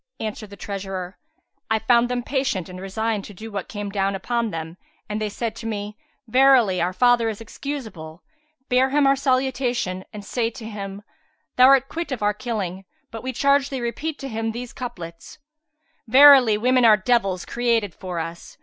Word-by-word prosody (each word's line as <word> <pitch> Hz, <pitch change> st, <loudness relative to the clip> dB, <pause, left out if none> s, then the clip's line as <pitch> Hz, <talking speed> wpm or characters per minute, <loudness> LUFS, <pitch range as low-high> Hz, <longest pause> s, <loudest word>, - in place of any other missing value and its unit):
Answered 215 Hz, -1 st, -5 dB
the 200 Hz, -, -12 dB
treasurer, 195 Hz, -2 st, -6 dB, 0.5 s
"I 220 Hz, -, +3 dB
found 235 Hz, +2 st, +3 dB
them 245 Hz, -1 st, -2 dB
patient 260 Hz, -, -1 dB
and 185 Hz, 0 st, -9 dB
resigned 215 Hz, +2 st, -2 dB
to 210 Hz, +2 st, -9 dB
what 200 Hz, -3 st, -5 dB
came 205 Hz, -2 st, -5 dB
down 195 Hz, -1 st, 0 dB
upon 235 Hz, +4 st, -1 dB
them 165 Hz, -1 st, -6 dB, 0.3 s
and 210 Hz, +1 st, -3 dB
they 215 Hz, -, -1 dB
said 225 Hz, +1 st, -4 dB
to 225 Hz, -, -6 dB
me, 210 Hz, -1 st, -4 dB, 0.3 s
'Verily, 250 Hz, -6 st, +4 dB
our 175 Hz, +1 st, +1 dB
father 235 Hz, +3 st, +3 dB
is 215 Hz, -, -5 dB
excusable; 220 Hz, -, -7 dB, 0.4 s
bear 255 Hz, +1 st, +3 dB
him 285 Hz, +1 st, +3 dB
our 275 Hz, 0 st, +5 dB
salutation 255 Hz, -7 st, 0 dB
and 205 Hz, -1 st, -9 dB
say 230 Hz, +1 st, -1 dB
to 235 Hz, -1 st, -10 dB
him, 200 Hz, -2 st, -7 dB, 0.5 s
'Thou 255 Hz, 0 st, +7 dB
art 270 Hz, 0 st, +5 dB
quit 335 Hz, 0 st, -5 dB
of 245 Hz, -5 st, -3 dB
our 205 Hz, 0 st, +2 dB
killing. 205 Hz, -5 st, -4 dB, 0.3 s
But 225 Hz, -1 st, -7 dB
we 260 Hz, -, -3 dB
charge 280 Hz, +2 st, +2 dB
thee 270 Hz, -, -4 dB
repeat 280 Hz, +6 st, -3 dB
to 275 Hz, -, -5 dB
him 225 Hz, -2 st, -3 dB
these 240 Hz, +1 st, -7 dB
couplets, 170 Hz, -9 st, -8 dB, 0.7 s
'Verily 260 Hz, -3 st, +8 dB
women 250 Hz, +3 st, +3 dB
are 220 Hz, -2 st, +7 dB
devils 195 Hz, -4 st, 0 dB
created 230 Hz, -5 st, 0 dB
for 180 Hz, -2 st, -6 dB
us. 165 Hz, +1 st, -6 dB
225 Hz, 175 wpm, -23 LUFS, 195-250 Hz, 0.7 s, Verily